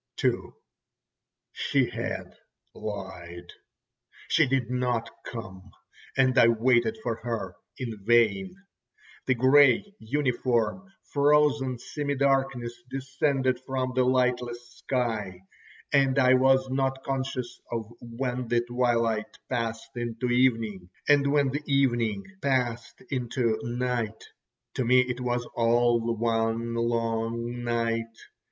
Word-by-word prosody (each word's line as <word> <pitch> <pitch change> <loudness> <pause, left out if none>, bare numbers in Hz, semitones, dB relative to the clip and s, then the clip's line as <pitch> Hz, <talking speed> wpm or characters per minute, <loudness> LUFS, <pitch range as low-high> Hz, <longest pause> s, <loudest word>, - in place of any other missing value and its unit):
ho!" - - +4
II - - -9 1.0
She - - +1
had - - -4 0.4
lied. 90 -4 -7 0.8
She - - +4
did 130 -2 0
not 125 -2 -1
come, 95 -4 -8 0.5
and 130 -1 +4
I 115 - +7
waited 115 -1 +3
for 115 -2 -1
her 115 -6 -4 0.2
in 115 -6 -6
vain. 120 - +3 0.7
The 130 - +3
grey, 135 - +5
uniform, 125 - -1 0.2
frozen 145 -3 +3
semi 145 +4 -3
darkness 135 -3 +1 0.2
descended 130 -1 0
from 130 0 -2
the 130 0 +3
lightless 125 -1 0
sky, 110 -8 -3 0.5
and 135 -1 +3
I 130 -1 +5
was 130 +1 +4
not 135 0 -1
conscious 130 -2 -3
of 115 -1 -4
when 125 +1 -4
the 120 0 +2
twilight 120 -2 0
passed 115 -3 -3
into 120 +1 -3
evening, 115 -7 +1 0.2
and 140 -1 +4
when 140 -2 +3
the 145 +3 -2
evening 120 -7 +1 0.2
passed 120 -5 -1
into 120 -3 0
night—to 120 0 -4
me 125 +2 +5
it 125 0 -3
was 120 -1 -1
all 120 0 +2
one 115 0 0
long 115 +1 -1
night. 115 -1 -1
120 Hz, 110 wpm, -27 LUFS, 115-130 Hz, 1.0 s, I